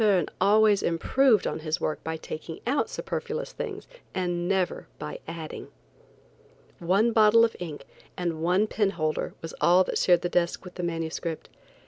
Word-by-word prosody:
Verne 195 -6 +3
always 205 +1 +5
improved 220 +7 +3
his 155 +2 -2
work 155 - -2
by 160 0 -3
taking 160 +1 -7
out 265 +5 +1
superfluous 470 +1 -4
things - - -6 0.3
and 175 -1 -1
never 190 -2 0
by 150 - -6
adding. 165 -1 -7 1.1
One 195 +7 +2
bottle 220 +1 +6
of 225 - -3
ink 165 -5 -7 0.3
and 170 -3 -2
one 180 +5 +3
penholder 195 -8 -1
was 165 - -6
all 180 +2 +6
that - - -2
shared 175 -2 +4
the - - +1
desk 175 +1 0
with 180 - -9
the 180 - -6
manuscript. 165 -1 -3
180 Hz, 150 wpm, -27 LUFS, 165-210 Hz, 1.1 s, bottle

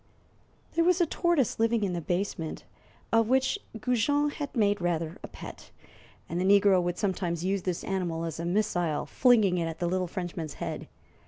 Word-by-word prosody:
There 335 - +3
was 360 +1 +3
a 345 - +4
tortoise 330 -7 +1
living 230 -1 +2
in 190 -3 0
the 170 - -2
basement, 175 -2 -3 0.5
of 225 -1 +4
which 265 +9 +2 0.2
Goujon 270 +6 +1
had 290 -1 -6
made 205 -4 +2
rather 170 0 -1
a - - -7
pet, - - -10 0.6
and 175 +2 -2
the 200 +2 +6
negro 195 -2 +4
would 175 0 -2
sometimes 180 -4 -1
use 195 +1 0
this 180 -1 -3
animal 175 -4 -2
as 165 -1 -5
a 170 - -3
missile, 175 -4 0
flinging 215 -8 +4
it 165 - -1
at 165 -1 -5
the 175 - -2
little 180 +1 0
Frenchman's 170 -3 -5
head. - - -5
190 Hz, 180 wpm, -28 LUFS, 175-230 Hz, 0.6 s, the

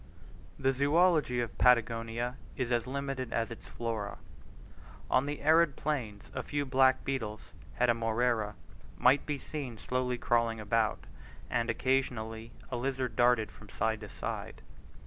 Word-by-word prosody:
The 135 0 +2
zoology 145 -2 +3
of 120 - -4
Patagonia 115 0 +2 0.2
is 125 -2 -1
as 120 0 +1
limited 135 -2 -3
as 115 0 -1
its 115 - -9
flora. 115 -4 -4 0.9
On 130 +2 +3
the 145 0 -4
arid 160 -1 +5
plains 120 -9 -3
a 130 - -2
few 145 +2 -2
black 130 0 +3
beetles 110 -6 -4 0.3
(Heteromera) 115 -2 +1 0.4
might 130 +3 +4
be 150 -1 -1
seen 135 -5 -6
slowly 125 +1 -1
crawling 115 -2 +1
about, 110 +1 0 0.5
and 120 0 +1
occasionally 115 -3 -1 0.2
a 125 - -1
lizard 130 -2 -2
darted 120 -3 +3
from 105 - -15
side 110 +2 -1
to 105 -1 -9
side. - - -5
125 Hz, 135 wpm, -31 LUFS, 115-135 Hz, 0.9 s, arid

